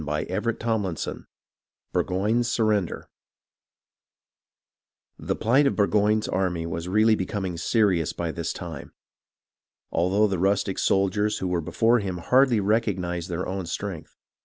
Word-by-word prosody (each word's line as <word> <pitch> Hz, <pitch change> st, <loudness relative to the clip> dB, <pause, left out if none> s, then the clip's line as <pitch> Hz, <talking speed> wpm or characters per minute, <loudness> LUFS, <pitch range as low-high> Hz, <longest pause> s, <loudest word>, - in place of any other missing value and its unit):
CHAPTER 85 Hz, +10 st, -2 dB
XXII 105 Hz, -8 st, -2 dB, 0.7 s
burgoyne's 110 Hz, +6 st, +1 dB
surrender 105 Hz, -6 st, 0 dB, 2.1 s
The -, -, -2 dB
plight 135 Hz, +6 st, +3 dB
of -, -, 0 dB
Burgoyne's 105 Hz, +1 st, +2 dB
army 90 Hz, -3 st, -1 dB
was 85 Hz, +1 st, -4 dB
really 110 Hz, +4 st, +4 dB
becoming 95 Hz, -2 st, -2 dB
serious 90 Hz, -3 st, +1 dB
by 85 Hz, -1 st, -3 dB
this 85 Hz, 0 st, -3 dB
time, 85 Hz, -4 st, -8 dB, 1.0 s
although 95 Hz, +5 st, +2 dB
the 95 Hz, -4 st, -1 dB
rustic 95 Hz, 0 st, +1 dB
soldiers 100 Hz, +2 st, +1 dB
who 95 Hz, -, -3 dB
were 90 Hz, -1 st, 0 dB
before 115 Hz, +9 st, +2 dB
him 95 Hz, -3 st, -3 dB
hardly 125 Hz, +6 st, +3 dB
recognized 95 Hz, -5 st, -1 dB
their 90 Hz, +1 st, -3 dB
own 95 Hz, -2 st, -4 dB
strength. 90 Hz, -2 st, -6 dB
95 Hz, 120 wpm, -25 LUFS, 90-110 Hz, 2.1 s, really